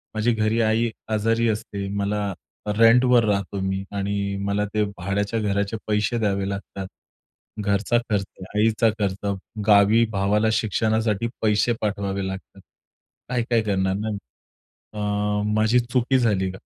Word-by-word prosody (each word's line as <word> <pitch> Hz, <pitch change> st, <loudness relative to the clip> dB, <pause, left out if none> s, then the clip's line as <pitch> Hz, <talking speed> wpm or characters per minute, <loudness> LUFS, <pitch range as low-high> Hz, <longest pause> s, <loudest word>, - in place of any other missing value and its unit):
माझी 110 Hz, +2 st, +2 dB
घरी 110 Hz, +1 st, +1 dB
आई 110 Hz, +1 st, +2 dB, 0.2 s
आजारी 115 Hz, +2 st, +2 dB
असते. 100 Hz, -2 st, -3 dB
मला 100 Hz, 0 st, -1 dB, 0.3 s
रेंटवर 115 Hz, +3 st, +5 dB
राहतो 100 Hz, 0 st, -1 dB
मी. 95 Hz, 0 st, -2 dB
आणि 100 Hz, 0 st, -2 dB
मला 105 Hz, +1 st, 0 dB
ते 105 Hz, -, +2 dB
भाड्याच्या 100 Hz, +4 st, -1 dB
घराचे 100 Hz, +1 st, -1 dB
पैसे 105 Hz, +3 st, +1 dB
द्यावे 100 Hz, -2 st, 0 dB
लागतात. 100 Hz, -1 st, -6 dB, 0.7 s
घरचा 100 Hz, +3 st, +1 dB
खर्च, 100 Hz, -3 st, +1 dB, 0.3 s
आईचा 110 Hz, +1 st, +3 dB
खर्च, 100 Hz, 0 st, -1 dB, 0.3 s
गावी 105 Hz, +3 st, +6 dB
भावाला 105 Hz, +2 st, +1 dB
शिक्षणासाठी 110 Hz, 0 st, 0 dB
पैसे 110 Hz, +2 st, +2 dB
पाठवावे 100 Hz, -2 st, -2 dB
लागतात. 95 Hz, 0 st, -8 dB, 0.7 s
काय-काय 120 Hz, -2 st, +1 dB
करणार 95 Hz, -2 st, 0 dB
ना, 105 Hz, +2 st, -3 dB
मी. 105 Hz, -, -3 dB, 0.8 s
अ, 105 Hz, 0 st, -1 dB
माझी 110 Hz, +3 st, +3 dB
चुकी 125 Hz, +2 st, +1 dB
झाली 100 Hz, -6 st, +1 dB
का? 95 Hz, -, -10 dB
105 Hz, 130 wpm, -23 LUFS, 100-115 Hz, 0.8 s, गावी